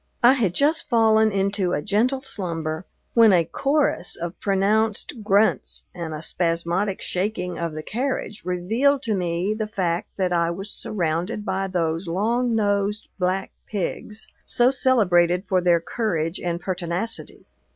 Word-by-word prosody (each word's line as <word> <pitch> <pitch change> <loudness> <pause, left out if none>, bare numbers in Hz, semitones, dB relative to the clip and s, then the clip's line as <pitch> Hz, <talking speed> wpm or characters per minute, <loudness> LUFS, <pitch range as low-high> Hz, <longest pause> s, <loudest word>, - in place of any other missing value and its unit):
I 245 +2 +8
had 210 -10 0
just 300 +3 +1
fallen 220 -1 +4
into 195 -2 0
a - - 0
gentle 245 +6 +1
slumber, 165 - -3 0.3
when 230 -2 +7
a 175 -3 +4
chorus 275 - +1
of 170 0 -5
pronounced 210 +3 0
grunts 205 +2 +2
and 170 -3 -5
a 155 0 -6
spasmodic 175 +4 -1
shaking 180 -2 -2
of 170 -2 -2
the 155 0 -6
carriage 245 - -3
revealed 225 +11 +1
to 225 -4 0
me 180 +1 -1
the 215 0 -3
fact 180 -5 -1
that 185 -2 0
I 170 -1 +2
was 195 +4 -4
surrounded 200 0 -2
by 195 -1 -1
those 170 -1 -1
long 230 +7 0
nosed 205 0 0
black 185 +1 -1 0.2
pigs, 210 +1 -4 0.2
so 245 +2 +3
celebrated 180 -10 +3
for 185 -1 +2
their 175 -1 +4
courage 165 -4 -2
and 170 -1 -2
pertinacity. 180 +4 -2
195 Hz, 145 wpm, -23 LUFS, 175-220 Hz, 0.3 s, I